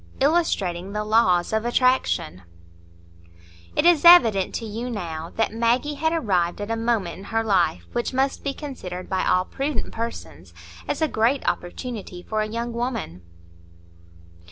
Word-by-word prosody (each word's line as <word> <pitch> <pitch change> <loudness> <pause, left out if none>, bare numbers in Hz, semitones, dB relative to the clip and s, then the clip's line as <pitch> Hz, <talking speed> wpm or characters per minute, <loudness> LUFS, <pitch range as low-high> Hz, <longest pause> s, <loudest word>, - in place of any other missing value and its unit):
Illustrating 200 - 0
the 210 0 -2
Laws 210 -5 +2
of 220 0 +1
Attraction 240 - +1 1.3
It - - +1
is 345 -4 +5
evident 230 - +6
to 230 - -4
you 225 +3 -5
now 165 -7 -5
that 225 -1 0
Maggie 235 +6 +1
had 320 +3 0
arrived 190 - 0
at 205 +2 -4
a - - +1
moment 225 -6 -1
in - - -10
her 225 +2 -1
life 175 - +1
which 240 - -1
must 270 +1 0
be 280 - -1
considered 190 - -7
by 190 -1 -1
all 180 0 +2
prudent 275 0 -3
persons 85 - -7 0.3
as - - -1
a - - +3
great 245 +2 0
opportunity 190 -1 -4
for 215 +2 -2
a 215 - -1
young 235 +2 -4
woman. 230 - -4
225 Hz, 155 wpm, -23 LUFS, 180-255 Hz, 1.3 s, evident